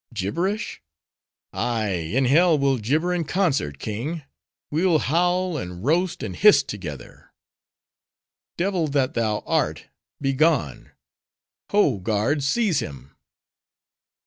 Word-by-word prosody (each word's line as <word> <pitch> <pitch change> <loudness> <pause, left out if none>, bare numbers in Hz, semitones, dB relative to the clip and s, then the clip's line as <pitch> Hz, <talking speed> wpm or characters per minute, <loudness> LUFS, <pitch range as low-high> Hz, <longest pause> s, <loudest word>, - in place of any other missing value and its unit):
Gibberish? 175 - -2 0.7
ay, 115 -3 -1
in 95 +9 0
hell 160 +5 +4
we'll 135 -2 +1
gibber 155 +11 0
in 175 -2 0
concert, 150 - 0
king! 130 - -4 0.5
we'll 165 +2 +3
howl, 175 +3 +1
and 90 -4 -6
roast, 175 +5 +1
and - - -5
hiss 210 +1 +6
together!" 75 -11 -9 1.3
"Devil 180 -2 0
that 140 -3 0
thou 110 -2 -1
art, - - -1 0.3
begone! 135 - +1 0.8
Ho, 150 - +2
guards! 115 +9 0
seize 215 -6 +2
him!" 70 0 -8
140 Hz, 105 wpm, -23 LUFS, 105-175 Hz, 1.3 s, hiss